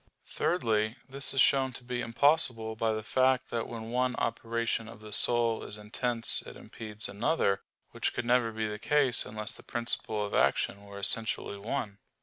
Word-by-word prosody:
Thirdly, 110 -9 0
this 140 +1 -3
is 135 - +2
shown 130 -1 +3
to 125 - -9
be 120 0 -4
impossible 120 -3 +2
by 110 0 0
the 110 0 -3
fact 130 +2 +1
that 115 -1 -2
when 115 -1 -7
one 125 +1 0
operation 115 0 -2
of 115 -2 -12
the 110 0 -12
soul 115 0 +4
is 105 - -8
intense 115 +2 0
it - - -11
impedes 110 -1 -4
another, 100 -2 0 0.3
which - - -2
could - - -4
never 120 -1 +2
be 110 0 -3
the 105 0 -6
case 140 -2 +1
unless 105 0 0
the - - -10
principle 115 -3 +1
of 100 - -7
action 100 +8 +1
were 100 0 -11
essentially 110 0 +3
one. 105 -2 -4
115 Hz, 175 wpm, -29 LUFS, 110-125 Hz, 0.3 s, soul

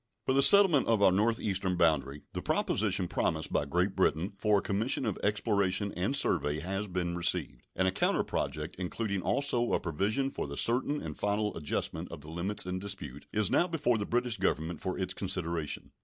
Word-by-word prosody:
For 130 - +2
the 135 - +4
settlement 180 -3 +6
of 110 -3 +3
our 95 - +6
northeastern 100 -2 0
boundary 75 -5 +1
the - - -3
proposition 95 -3 +1
promised 80 -2 -1
by - - +1
Great 90 +6 0
Britain 85 +7 +1
for 105 0 +2
a - - +1
commission 110 +7 0
of 105 -4 -2
exploration 100 -2 0
and 95 +10 0
survey 75 - +1
has 95 +5 -3
been 90 -2 -2
received, 85 -7 -1
and 95 +1 +1
a - - +3
counter - - +1
project, 75 +3 -3
including 100 +2 -2
also 125 0 0
a - - +3
provision 105 - -1
for - - -4
the 70 0 -7
certain 130 +5 +1
and - - -5
final 105 +1 -1
adjustment 80 +2 -3
of 85 - -8
the 75 +2 -10
limits 95 +5 -2
in 90 0 -3
dispute, 95 -9 -6
is 105 -3 +1
now 175 - +3
before 140 -9 +1
the 100 - -3
British 120 -1 -1
Government 80 +1 -1
for 95 - -3
its 95 -1 -2
consideration. 85 -6 -3
95 Hz, 190 wpm, -30 LUFS, 85-110 Hz, -, settlement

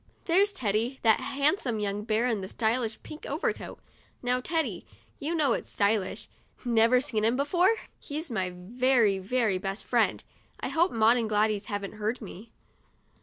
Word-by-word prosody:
There's 390 +4 +4
Teddy— 235 - -1
that 220 -2 +5
handsome 280 - 0
young 205 0 -2
bear 220 +2 +1
in 225 -5 0
the 190 - -5
stylish 225 +1 -1
pink 305 - -9
overcoat. - - -3 0.4
Now 250 +1 +1
Teddy, 265 - -1 0.4
you 320 +4 -2
know 290 -7 +3
it's - - -4
stylish. 200 -2 0 0.4
Never 230 +1 +4
seen 245 -5 -1
him 230 +3 +3
before? 345 +7 +3 0.3
He's 305 +1 -5
my 190 -5 -1
very, 230 +1 +2
very 210 -1 0
best 195 +2 -4
friend. - - +1 0.4
I - - -3
hope 340 +3 +2
Maud 225 +2 +4
and 225 -2 -1
Gladys 210 -1 +1
haven't 205 -1 -4
heard 215 +3 -2
me." 215 +1 -10
230 Hz, 160 wpm, -28 LUFS, 210-270 Hz, 0.4 s, that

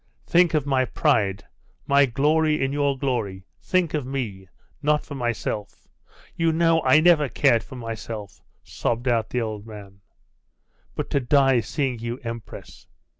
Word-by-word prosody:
'Think 175 -2 +3
of 150 -3 +1
my 135 -2 +2
pride 100 -5 +1 0.4
my 140 0 +4
glory 150 +4 +2
in 135 +1 -1
your 140 -1 0
glory; 110 -9 -2 0.2
think 180 -4 0
of 150 -3 -1
me.... 120 -8 -5 0.3
Not 150 0 +1
for 145 - -8
myself! 120 -5 -4 0.5
You 165 -1 +2
know 165 0 +3
I 155 - +5
never 155 -4 +4
cared 115 -2 +3
for 130 +4 -11
myself!' 110 -4 -7 0.2
sobbed 120 +2 -3
out 115 -3 +1
the 125 - -1
old 110 -1 -5
man. 100 -2 -11 0.9
'But - - -4
to 140 - +2
die 135 -1 +3
seeing 130 - -2
you 120 +1 -4
empress! 115 -1 -9
130 Hz, 150 wpm, -24 LUFS, 115-150 Hz, 0.9 s, I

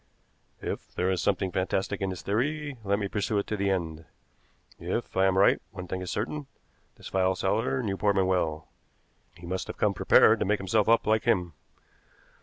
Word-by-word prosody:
If - - -5
there 90 +1 +1
is 95 - 0
something 95 -2 0
fantastic 95 +2 -1
in 95 - 0
this 90 -5 -6
theory, 145 +7 -1
let 100 0 +1
me 100 -1 -2
pursue 105 +1 -1
it 100 - 0
to 110 - -3
the 100 -1 0
end. 80 -4 -2 0.7
If - - -3
I 95 0 +4
am 95 0 +1
right, 100 - +4
one 90 -2 -7
thing 95 +1 -4
is 90 - -5
certain: 140 +7 -3 0.5
this - - -11
file 95 0 +1
seller 110 +7 0
knew 100 -3 -2
Portman 100 -2 +2
well. 80 -4 -1 0.7
He 85 - -11
must 90 +2 -3
have - - -7
come 105 -1 +2
prepared 90 - +5
to - - 0
make 105 +2 +2
himself 100 +3 +1
up 115 - +4
like 110 0 +2
him. 90 -8 +1
95 Hz, 195 wpm, -28 LUFS, 95-105 Hz, 0.7 s, prepared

